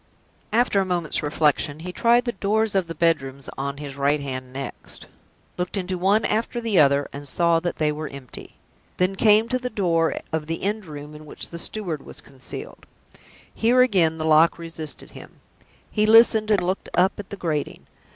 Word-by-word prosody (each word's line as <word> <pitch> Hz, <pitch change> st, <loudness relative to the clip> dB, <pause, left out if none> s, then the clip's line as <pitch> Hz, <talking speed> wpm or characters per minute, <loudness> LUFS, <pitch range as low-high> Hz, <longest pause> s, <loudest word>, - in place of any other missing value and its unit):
After 225 Hz, -3 st, +2 dB
a -, -, +1 dB
moment's 175 Hz, -4 st, +1 dB
reflection, 150 Hz, 0 st, 0 dB
he 180 Hz, +2 st, -5 dB
tried 235 Hz, +3 st, +3 dB
the 240 Hz, -, 0 dB
doors 215 Hz, +1 st, 0 dB
of 190 Hz, -3 st, +1 dB
the 165 Hz, -, -6 dB
bedrooms 140 Hz, -5 st, 0 dB
on 140 Hz, +1 st, -4 dB
his 140 Hz, -2 st, -8 dB
right 140 Hz, +2 st, +2 dB
hand 130 Hz, -2 st, -6 dB
next, 135 Hz, +1 st, -8 dB, 0.5 s
looked 180 Hz, +3 st, -2 dB
into 185 Hz, -1 st, -2 dB
one 195 Hz, +4 st, +2 dB
after 230 Hz, +3 st, -1 dB
the 225 Hz, -5 st, +1 dB
other, 140 Hz, -1 st, +4 dB
and 140 Hz, +1 st, -7 dB
saw 170 Hz, +3 st, +2 dB
that 175 Hz, +1 st, -3 dB
they 155 Hz, -1 st, +1 dB
were 150 Hz, +1 st, -5 dB
empty, 135 Hz, -3 st, -10 dB, 0.4 s
then 185 Hz, +1 st, +1 dB
came 215 Hz, +2 st, +4 dB
to 255 Hz, -, 0 dB
the 250 Hz, 0 st, -4 dB
door 170 Hz, -7 st, +1 dB, 0.2 s
of 155 Hz, -1 st, -2 dB
the 165 Hz, 0 st, -4 dB
end 210 Hz, +1 st, -1 dB
room 150 Hz, 0 st, -9 dB
in 150 Hz, 0 st, -12 dB
which -, -, -7 dB
the 170 Hz, -, -7 dB
steward 175 Hz, -7 st, -3 dB
was -, -, -10 dB
concealed. 135 Hz, -2 st, -10 dB, 0.7 s
Here, 240 Hz, +3 st, +3 dB
again, 175 Hz, -9 st, +2 dB
the 155 Hz, -, -3 dB
lock 160 Hz, +1 st, +5 dB
resisted 165 Hz, -2 st, -7 dB
him. -, -, -13 dB, 0.5 s
He 215 Hz, -1 st, +2 dB
listened, 220 Hz, -1 st, +6 dB
and 205 Hz, -4 st, +2 dB
looked 185 Hz, +2 st, -2 dB
up 180 Hz, +3 st, +2 dB
at 200 Hz, -, -8 dB
the 200 Hz, -, -7 dB
grating. 155 Hz, -6 st, -3 dB
170 Hz, 190 wpm, -23 LUFS, 150-210 Hz, 0.7 s, listened